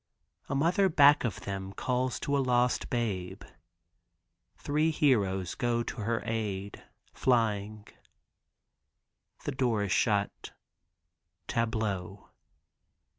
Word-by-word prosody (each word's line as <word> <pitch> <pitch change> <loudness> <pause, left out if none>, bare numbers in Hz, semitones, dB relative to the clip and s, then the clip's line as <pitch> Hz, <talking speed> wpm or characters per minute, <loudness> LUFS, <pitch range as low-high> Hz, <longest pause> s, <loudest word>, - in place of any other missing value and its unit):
A 140 - -1
mother 175 +7 +3
back 145 -2 +6
of 100 -5 -3
them 95 0 -5
calls 125 +2 -1
to 140 -1 0
a - - +2
lost 125 -1 +1
babe; 95 -6 -3 1.1
three 150 +2 +1
heroes 100 - +1
go 120 -1 0
to - - -6
her 115 +1 -1
aid 100 -3 -3 0.3
flying. 110 -4 0 1.6
The - - -2
door 125 -6 0
is 100 - -3
shut. 100 -2 0 0.9
Tableau. 105 -4 -2
115 Hz, 100 wpm, -29 LUFS, 100-130 Hz, 1.6 s, back